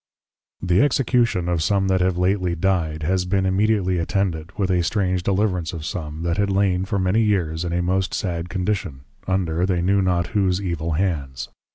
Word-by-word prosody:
_ - - -5
The 90 +4 +4
Execution 120 -9 +2
of 85 -2 0
some 95 +3 +1
that 95 -1 +2
have 90 -1 +1
lately 90 -1 +1
Dyed, 80 -4 0
has 90 +3 +1
been 95 +1 0
immediately 95 -1 +1
attended, 85 -2 -1
with 95 -2 0
a 90 -1 +2
strange 95 0 0
Deliverance 95 -3 0
of 80 -2 -6
some, 80 -1 -5
that 85 -1 -1
had 100 0 +1
lain 95 -2 +1
for 100 +1 -2
many 95 +4 +2
years, 90 -7 0
in 85 - -3
a 90 +1 0
most 95 +1 0
sad 85 -3 -3
Condition, 90 -7 -2 0.3
under, 90 -3 0
they 90 -2 +1
knew 100 +2 +3
not 90 -2 0
whose 95 -3 +2
evil 85 -4 -2
hands. 70 -8 -2
90 Hz, 190 wpm, -22 LUFS, 85-95 Hz, 0.3 s, The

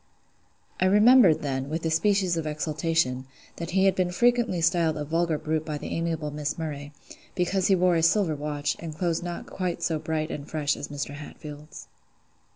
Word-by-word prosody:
I 185 - +3
remembered 210 -3 +6
then, 135 -1 -2
with 165 +2 -3
a 160 - +1
species 185 +1 +2
of 160 -2 -2
exultation, 150 -3 -1 0.3
that 170 -1 -5
he 190 +1 +2
had 195 - +5 0.2
frequently 240 -4 +2
been - - -2
styled 165 -2 +2
a 150 - -3
vulgar 165 +1 0
brute 155 0 -2
by 155 -2 -4
the - - -7
amiable 165 -3 -2
Miss 150 0 -3
Murray, 145 -3 -5 0.4
because 185 +1 +1
he 195 - +5
wore 180 -1 +3
a 165 - +2
silver 165 0 +3
watch, 145 0 -2
and 160 -2 -7
clothes 170 -1 0
not 175 0 -5
quite 180 -2 -4
so 160 -2 0
bright 155 0 -2
and 140 -1 -6
fresh 150 -2 0
as 145 - -6
Mr. 145 0 -5
Hatfield's. 150 +1 -10
160 Hz, 185 wpm, -26 LUFS, 150-175 Hz, 0.4 s, remembered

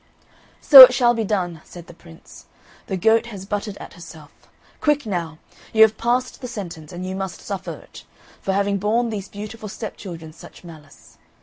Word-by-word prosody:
"So 275 -3 +10
it 255 -1 +10
shall 240 -1 +3
be 230 -1 -2
done!" 180 -6 -3
said 175 -2 -13
the 175 - -14
Prince. 165 -1 -17 0.4
"The 190 - -3
goat 225 +5 +2
has 200 -5 -9
butted 205 0 -5
at - - -11
herself. 160 -4 -13 0.5
Quick 295 -3 0
now! 170 -6 -4 0.4
you 220 0 +7
have 220 0 +3
passed 250 +3 -2
the 250 - -6
sentence, 175 -10 -8
and 180 +1 -7
you 185 0 -5
must 190 -2 -6
suffer 200 -2 -6
it, - - -15 0.4
for 195 - -2
having 200 0 0
borne 225 +4 0
these 200 -3 -6
beautiful 215 +1 -9
stepchildren 175 -7 -9
such 165 - -15
malice." 155 -4 -16
200 Hz, 180 wpm, -21 LUFS, 175-225 Hz, 0.5 s, So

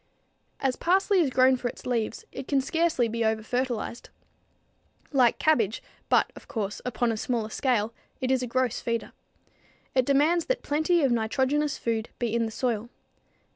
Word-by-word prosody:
As 265 -2 0
parsley 385 +2 +2
is 315 -6 +3
grown 255 0 +4
for 245 - -3
its 245 - -8
leaves, 230 -3 -2
it 270 - -7
can 280 - +2
scarcely 310 -2 +1
be 230 +1 -2
over 220 0 +1
fertilized. 245 -1 -3 1.0
Like 255 -5 +4
cabbage, 230 -9 +2 0.3
but, - - +3
of - - -13
course, 210 -5 -3
upon 240 -1 0
a 225 - -2
smaller 225 -1 -2
scale, 230 -5 0 0.3
it 260 0 -1
is 260 -1 +2
a 250 - -2
gross 255 0 0
feeder. 230 -1 -2 0.8
It 255 -2 +3
demands 305 +5 +3
that - - -1
plenty 315 +3 +2
of 270 - +3
nitrogenous 265 +6 +1
food 225 -1 -2
be 235 -3 -2
in 235 -1 +1
the - - -6
soil. 235 -1 -2
250 Hz, 170 wpm, -27 LUFS, 230-280 Hz, 1.0 s, grown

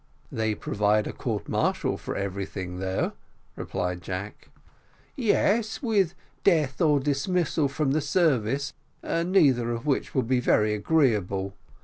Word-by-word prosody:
"They 110 -1 -1
provide 105 +1 +1
a - - -5
court - - -3
martial - - 0
for - - -6
everything 95 -2 -4
though," 95 0 -1 0.4
replied 90 0 -3
Jack. 95 +4 -6 0.7
"Yes, 225 -1 +1
with 200 -7 +2 0.3
death 155 -8 +2
or 150 -3 +4
dismissal 150 +2 0
from 135 0 -1
the 155 +2 +1
service 140 - +1 0.3
neither 165 -9 +2
of 115 +3 -4
which 145 -3 -1
would 130 -3 +2
be 130 0 +2
very 105 -3 +3
agreeable. 105 - +1
130 Hz, 125 wpm, -26 LUFS, 105-160 Hz, 0.7 s, or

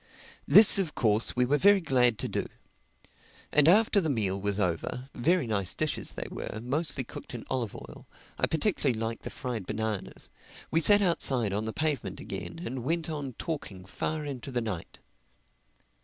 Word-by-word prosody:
This 210 -2 +9
of 175 -6 -2
course 110 -1 +2
we 125 0 +3
were 145 +4 +1
very 200 0 +6
glad 125 - +2
to - - -2
do. - - -3 1.0
And 150 0 +5
after 205 +3 +5
the 160 - -1
meal 100 -7 -1
was 100 0 -1
over 90 - -2
(very 165 +5 +1
nice 100 -5 -1
dishes - - -2
they - - -5
were, 110 - -6
mostly 135 +4 -2
cooked 120 - -9
in 115 - -8
olive 120 -5 -2
oil—I - - -7
particularly 150 - 0
liked 115 0 -3
the - - -6
fried 120 -7 -5
bananas) 105 -2 -4 0.4
we 165 - +3
sat 205 +5 +6
outside 130 - +2
on 105 +2 -1
the 110 - -3
pavement 135 - -2
again 100 - -6
and 125 -1 -5
went 165 +4 -1
on 145 -4 -5
talking 110 - -6
far 150 +10 -3
into 135 -2 -6
the 125 -2 -1
night. 105 -8 -5
125 Hz, 170 wpm, -28 LUFS, 110-155 Hz, 1.0 s, This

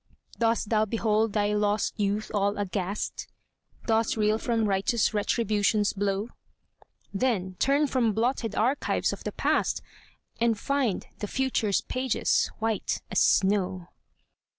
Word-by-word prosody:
Dost 230 -2 +1
thou 215 -2 +3
behold 220 0 +1
thy 210 -1 +1
lost 210 0 +1
youth 205 +1 -1
all 205 0 +1
aghast? 200 0 -3 0.6
Dost 225 -1 +1
reel 215 0 +2
from 230 -2 0
righteous 200 +4 +1
Retribution's 210 -1 +1
blow? 200 +2 -1 0.8
Then 195 -5 0
turn 280 +2 +3
from 250 -5 +1
blotted 225 0 -1
archives 255 +6 +1
of - - -8
the - - -3
past, - - 0 0.6
And 230 -1 +2
find 265 -3 -1
the 210 - -3
future's 230 -5 0
pages 255 -1 0
white 225 -1 -2
as - - +2
snow. 190 -2 +2
215 Hz, 125 wpm, -27 LUFS, 205-230 Hz, 0.8 s, thou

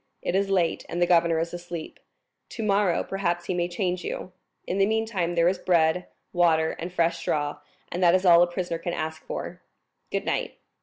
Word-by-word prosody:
"It - - -1
is 195 +1 +1
late, 180 -4 +1
and 175 - -3
the 175 - +4
governor 170 -1 +3
is 165 +1 -2
asleep. 175 -2 -7 0.5
Tomorrow, 200 -5 +1
perhaps, 175 -3 -2
he 185 - -1
may 175 -1 0
change 180 0 -2
you. 185 - -5 0.3
In 190 - -2
the 195 - +4
meantime 215 -6 -1
there 170 0 +4
is 180 0 +1
bread, 170 0 +2 0.3
water, 160 -3 +3
and 175 +2 -5
fresh 170 -1 +1
straw; 145 -1 -1 0.3
and 175 - -3
that 175 0 +6
is 185 +1 +1
all 170 -1 +8
a 175 - +5
prisoner 175 -1 -3
can 175 +1 -3
wish 160 0 -2
for. - - -6 0.5
Goodnight." - - -2
175 Hz, 190 wpm, -26 LUFS, 170-185 Hz, 0.5 s, all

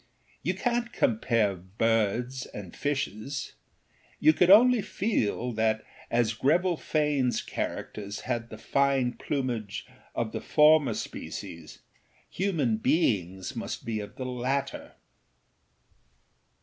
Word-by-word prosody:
You - - -1
canât 240 -1 -1
compare 120 - +2
birds 115 +6 0
and 95 -4 -9
fishes; 135 -2 -3 0.7
you 155 +1 +6
could 180 +2 +3
only 235 +4 +7
feel 125 - -1
that, 110 -1 +1 0.3
as 115 -1 +2
Greville 170 +9 +2
Faneâs 145 -8 0
characters 100 0 -4
had 120 -2 -3
the 110 - -8
fine 135 -1 +1
plumage 120 -7 -3 0.3
of - - -1
the - - -4
former 150 -6 +5
species, 80 -5 -7 0.5
human 160 - 0
beings 95 - 0
must - - -5
be 110 -2 -2
of 105 - -8
the 130 - -5
latter. 130 +2 -2
125 Hz, 110 wpm, -28 LUFS, 110-150 Hz, 0.7 s, only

